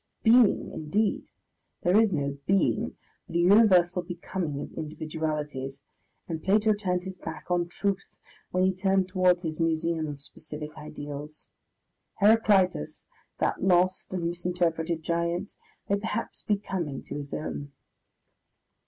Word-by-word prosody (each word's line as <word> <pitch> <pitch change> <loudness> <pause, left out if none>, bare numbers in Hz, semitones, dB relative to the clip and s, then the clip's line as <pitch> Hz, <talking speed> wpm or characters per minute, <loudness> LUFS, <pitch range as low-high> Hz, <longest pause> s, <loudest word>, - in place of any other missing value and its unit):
Being, 230 -1 +5
indeed! 200 +8 -1 0.5
there 180 +2 +3
is 220 -1 +5
no 140 -3 -2
being, 195 0 +2 0.3
but 170 - -9
a - - +3
universal 180 -2 +5
becoming 175 -3 -4
of - - -7
individualities, 150 -3 -4 0.4
and 160 -2 -4
Plato 210 +3 +4
turned 180 -4 -1
his 190 -1 -7
back 160 +2 -7
on 175 -1 +2
truth 195 +2 -3 0.3
when 185 0 +1
he 190 0 +3
turned 190 0 +2
towards 185 -1 +3
his 160 -1 -4
museum 165 0 0
of 145 -1 -6
specific 150 +2 -8
ideals. 150 0 -8 0.7
Heraclitus, 200 - +3 0.3
that - - 0
lost 185 0 +2
and 180 -2 -2
misinterpreted 170 -2 -1
giant, 170 +3 -1 0.3
may 200 0 +1
perhaps 225 +2 -4
be 210 - +1
coming 175 -9 -4
to - - -8
his 145 -1 -8
own.... 145 -2 -4
175 Hz, 130 wpm, -28 LUFS, 155-190 Hz, 0.7 s, Being